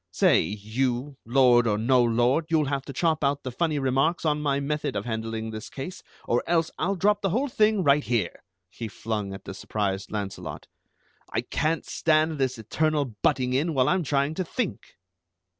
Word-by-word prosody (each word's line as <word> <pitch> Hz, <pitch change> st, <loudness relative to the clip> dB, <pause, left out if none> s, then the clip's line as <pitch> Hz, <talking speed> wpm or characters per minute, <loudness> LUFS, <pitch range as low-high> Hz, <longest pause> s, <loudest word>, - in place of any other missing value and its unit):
"Say, -, -, +4 dB
you, 120 Hz, +6 st, -2 dB
lord 120 Hz, -1 st, +5 dB
or 105 Hz, -2 st, +2 dB
no 125 Hz, +3 st, +3 dB
lord, 120 Hz, +6 st, +2 dB
you'll 160 Hz, -2 st, +3 dB
have 140 Hz, -1 st, -2 dB
to -, -, -6 dB
chop 155 Hz, +2 st, 0 dB
out 140 Hz, 0 st, +1 dB
the 130 Hz, -, -4 dB
funny 155 Hz, +3 st, 0 dB
remarks 135 Hz, +6 st, +1 dB
on 150 Hz, -1 st, +1 dB
my 140 Hz, -2 st, +1 dB
method 150 Hz, -4 st, -2 dB
of 100 Hz, -, -2 dB
handling 110 Hz, -1 st, -3 dB
this 110 Hz, +1 st, -7 dB
case, 140 Hz, +7 st, -7 dB, 0.2 s
or 120 Hz, -, +1 dB
else 165 Hz, -1 st, +1 dB
I'll 195 Hz, +5 st, +1 dB
drop 205 Hz, +2 st, +2 dB
the 195 Hz, -, +1 dB
whole 250 Hz, +10 st, +1 dB
thing 215 Hz, -5 st, +2 dB
right 145 Hz, -1 st, +4 dB
here," 120 Hz, -4 st, -1 dB, 0.3 s
he 110 Hz, +5 st, -7 dB
flung 105 Hz, -1 st, -4 dB
at 95 Hz, -, -8 dB
the -, -, -6 dB
surprised 100 Hz, -1 st, -3 dB
Launcelot. 100 Hz, -2 st, -5 dB, 0.7 s
"I -, -, 0 dB
can't 155 Hz, +1 st, -1 dB
stand 155 Hz, -1 st, +1 dB
this 130 Hz, -1 st, 0 dB
eternal 145 Hz, +3 st, 0 dB
butting 125 Hz, -3 st, +2 dB
in 150 Hz, +4 st, 0 dB
while 130 Hz, -1 st, +3 dB
I'm 185 Hz, 0 st, +2 dB
trying 140 Hz, 0 st, 0 dB
to 185 Hz, -, -2 dB
think!" 215 Hz, +4 st, -4 dB
135 Hz, 185 wpm, -26 LUFS, 115-155 Hz, 0.7 s, lord